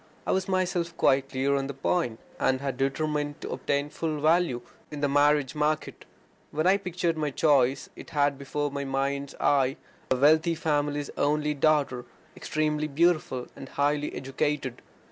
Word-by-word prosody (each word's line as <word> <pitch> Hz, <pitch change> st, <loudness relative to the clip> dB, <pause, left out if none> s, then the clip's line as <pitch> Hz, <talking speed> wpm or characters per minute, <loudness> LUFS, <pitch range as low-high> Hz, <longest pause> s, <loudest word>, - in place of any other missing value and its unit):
I -, -, 0 dB
was 190 Hz, 0 st, 0 dB
myself 180 Hz, -3 st, -1 dB
quite 135 Hz, 0 st, +3 dB
clear 135 Hz, +1 st, +1 dB
on 135 Hz, 0 st, -1 dB
the 140 Hz, -, -6 dB
point, 135 Hz, -4 st, -1 dB, 0.2 s
and 130 Hz, 0 st, +2 dB
had 135 Hz, -2 st, -3 dB
determined 145 Hz, +2 st, -1 dB
to -, -, -5 dB
obtain 140 Hz, +2 st, -1 dB
my -, -, -11 dB
full 155 Hz, -1 st, -3 dB
value 155 Hz, -5 st, +2 dB, 0.3 s
in 150 Hz, -1 st, -7 dB
the 145 Hz, -, +3 dB
marriage 145 Hz, -1 st, +3 dB
market. 150 Hz, +1 st, -1 dB, 0.4 s
When 155 Hz, +2 st, -1 dB
I 190 Hz, +2 st, +5 dB
pictured 175 Hz, -4 st, -2 dB
my 150 Hz, -1 st, 0 dB
choice, 135 Hz, -3 st, +2 dB
I -, -, -10 dB
had 145 Hz, -3 st, +1 dB
before 145 Hz, +1 st, -2 dB
my 140 Hz, 0 st, -3 dB
mind's 140 Hz, +1 st, -2 dB
eye 135 Hz, 0 st, +2 dB, 0.3 s
a -, -, +3 dB
wealthy 155 Hz, +5 st, +4 dB
father's 145 Hz, -2 st, -1 dB
only 150 Hz, +1 st, +1 dB
daughter, 145 Hz, -4 st, +1 dB, 0.3 s
extremely 155 Hz, 0 st, -1 dB
beautiful 155 Hz, -4 st, +1 dB
and 135 Hz, -, -9 dB
highly 145 Hz, +1 st, 0 dB
educated. 135 Hz, -1 st, -2 dB
145 Hz, 165 wpm, -27 LUFS, 135-155 Hz, 0.4 s, I